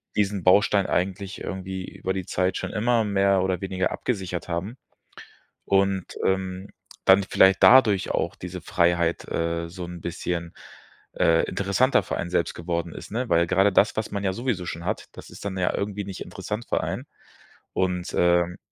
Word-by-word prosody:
diesen 100 -2 0
Baustein 100 +1 +4
eigentlich 95 +2 -2
irgendwie 95 0 -5
über 95 - -4
die 95 -2 -4
Zeit 90 0 0
schon - - -4
immer 115 +1 +2
mehr 100 -2 +2
oder 95 -2 0
weniger 95 -1 -1
abgesichert 95 -7 -3
haben. 90 +7 -3 0.9
Und, 95 -1 +1
ähm, 95 +1 -1 0.4
dann 95 +1 +6
vielleicht 95 0 +4
dadurch 110 -7 +6
auch - - -1
diese 90 0 -7
Freiheit, 85 -1 +1
äh, 85 0 -1
so 90 +1 -7
'n 85 0 -8
bisschen, 85 0 -4 0.6
äh, 80 0 +3
interessanter 100 +7 +2
für - - -3
einen 85 - -3
selbst 85 -2 0
geworden 85 0 -3
ist, - - -10
ne? 120 +2 -2
Weil 85 +1 +4
gerade 95 +4 +3
das, 100 +3 +3
was 110 - -1
man 100 -1 -3
ja 95 -1 0
sowieso 115 -5 -2
schon 85 -1 -5
hat, - - -2
das - - -12
ist - - -11
dann 95 -1 -3
ja 90 -1 +1
irgendwie 100 0 -3
nicht 95 -2 -7
interessant 110 +3 -5
für - - 0
einen. - - -4 0.7
Und, 90 -1 -1
ähm, 85 0 +3
95 Hz, 175 wpm, -25 LUFS, 90-100 Hz, 0.9 s, dann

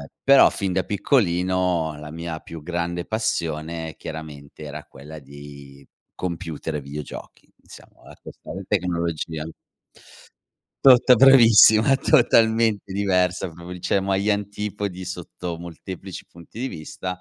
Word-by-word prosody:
Uhm, - - -11 0.2
però 135 0 +6
fin 95 -2 -3
da 95 - 0
piccolino 90 - 0
la 75 0 -9
mia 80 0 -5
più 80 -2 -10
grande 85 +1 -3
passione, 80 -7 -3
chiaramente, 75 -1 -9
era 75 +1 -8
quella 75 +3 -12
di 70 -1 -13 0.3
computer 80 -3 -5
e - - -3
videogiochi, 70 +1 -9
diciamo. - - -17
Ehm, - - -12
questa - - -12 0.2
tecnologia. 85 -4 -2 1.4
Tota 125 -1 +7
bravissima, 115 -1 +7
totalmente 115 -7 +2
diversa 90 -2 0
proprio, 85 +2 -10
cioè 100 - +1
mo 95 +1 -2
agli 100 +2 +1
antipodi 100 -2 -3
sotto 90 -1 -6
molteplici 85 +3 -9
punti 85 +6 -14
di 130 - -2
vista. 90 0 -7
90 Hz, 120 wpm, -23 LUFS, 80-100 Hz, 1.4 s, Tota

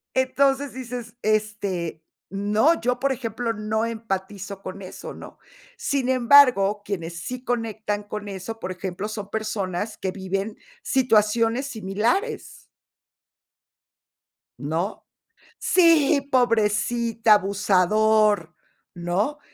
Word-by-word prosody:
entonces 270 +1 +2
dices: 245 -2 -7
"Este, 205 -7 -1 0.3
no, 210 +11 +2
yo, 250 +1 0
por 275 0 +1
ejemplo, 230 -2 -3
no 220 +1 -1
empatizo 200 -3 -5
con 195 +1 -7
eso", 185 - -8
¿no? - - -11 0.4
Sin 275 - -1
embargo, 245 -6 +5
quienes 170 -4 -5
sí 250 0 -6
conectan 220 -4 -2
con 205 0 -6
eso, 195 +4 -6
por 185 - -4
ejemplo, 185 +2 -5
son 210 -2 -6
personas 210 -2 -3
que 190 - -3
viven 195 +2 -4 0.2
situaciones 230 0 +2
similares. 225 - -2 2.0
¿No?, 165 +8 -3 0.5
"Sí, 325 -5 +4
pobrecita, 230 -1 +2
abusador", 205 -1 +2 0.4
¿no?, 180 +12 -1
215 Hz, 100 wpm, -24 LUFS, 195-245 Hz, 2.0 s, embargo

